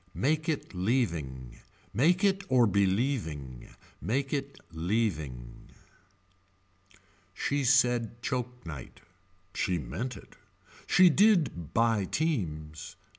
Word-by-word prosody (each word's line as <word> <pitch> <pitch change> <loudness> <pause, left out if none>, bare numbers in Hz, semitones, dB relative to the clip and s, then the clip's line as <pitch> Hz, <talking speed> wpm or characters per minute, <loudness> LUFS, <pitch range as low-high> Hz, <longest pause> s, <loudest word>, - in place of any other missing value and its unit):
Make 155 +4 0
it 150 -8 -3
leaving. 85 - -2 0.3
Make 175 - +3
it 195 0 +2
or 125 -2 +5
believing. 95 - -1 0.3
Make 135 - -1
it 140 -1 -3
leaving. 80 - -3 1.7
She 145 0 -1
said 125 -3 +2
choke 125 -3 -3
night. 70 -7 -9 0.5
She 90 - 0
meant 85 - -5
it. - - -15 0.5
She 180 -1 +6
did 160 - +2
buy 115 -3 +3
teams. 80 - -3
115 Hz, 95 wpm, -29 LUFS, -, 1.7 s, She